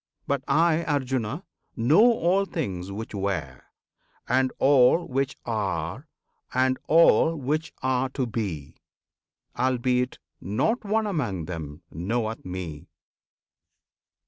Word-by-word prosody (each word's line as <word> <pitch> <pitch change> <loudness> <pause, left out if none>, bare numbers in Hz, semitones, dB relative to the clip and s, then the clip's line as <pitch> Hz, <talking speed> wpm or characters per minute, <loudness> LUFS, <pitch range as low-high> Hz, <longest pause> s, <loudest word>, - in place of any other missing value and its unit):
But 140 -2 -1
I, 165 0 +3
Arjuna! 135 - -1 0.3
know 130 - +4
all 195 -2 +2
things 100 - -4
which 110 +3 -6
were, 90 -10 -3 0.7
And 130 +1 +2
all 140 +5 +4
which 135 +1 -1
are, 105 - -3 0.4
and 130 0 +1
all 165 0 +5
which 155 +3 -2
are 130 0 +1
to 130 0 -2
be, 100 - -4 0.8
Albeit 125 0 0 0.2
not 130 - 0
one 215 +1 +1
among 120 - -2
them 80 -2 -7
knoweth 110 +7 -2
Me! 90 -5 -6
125 Hz, 105 wpm, -26 LUFS, 100-150 Hz, 0.8 s, all